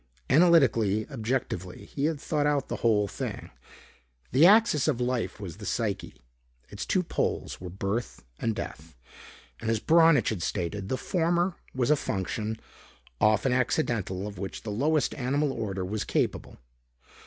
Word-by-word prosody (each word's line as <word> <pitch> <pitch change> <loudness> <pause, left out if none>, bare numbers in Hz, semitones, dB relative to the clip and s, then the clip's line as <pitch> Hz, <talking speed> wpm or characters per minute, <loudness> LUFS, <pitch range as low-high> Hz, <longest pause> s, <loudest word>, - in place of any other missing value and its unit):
Analytically, 125 - +4
objectively, 110 -7 -3
he 140 - -3
had 155 -2 0
thought 150 -1 0
out 145 -2 0
the - - -2
whole 105 -3 +2
thing. - - -6 0.8
The 145 +7 +7
axis 205 -9 +5
of 140 -6 +1
life 125 -3 -1
was 90 -6 -7
the - - -9
psyche. - - -2 0.5
Its 100 0 -6
two 185 - +2
poles 165 - -2
were 90 - -6
birth 100 +6 -3 0.2
and 115 -1 -1
death. 80 0 -7 0.6
And, 115 - -3
as 115 -1 +1
Braunitsch 165 -2 +5
had 105 -7 -3
stated, 95 +2 -3
the 130 - 0
former 175 +3 +1 0.2
was 125 +1 +1
a - - +6
function, 110 -1 -3 0.6
often 110 +4 +3
accidental, 115 - 0
of 100 -3 -7
which 95 0 -6
the 110 - -4
lowest 150 +8 +1
animal 140 +2 0
order 95 -6 -3
was 105 +3 -2
capable. - - -2
115 Hz, 150 wpm, -28 LUFS, 100-150 Hz, 0.8 s, The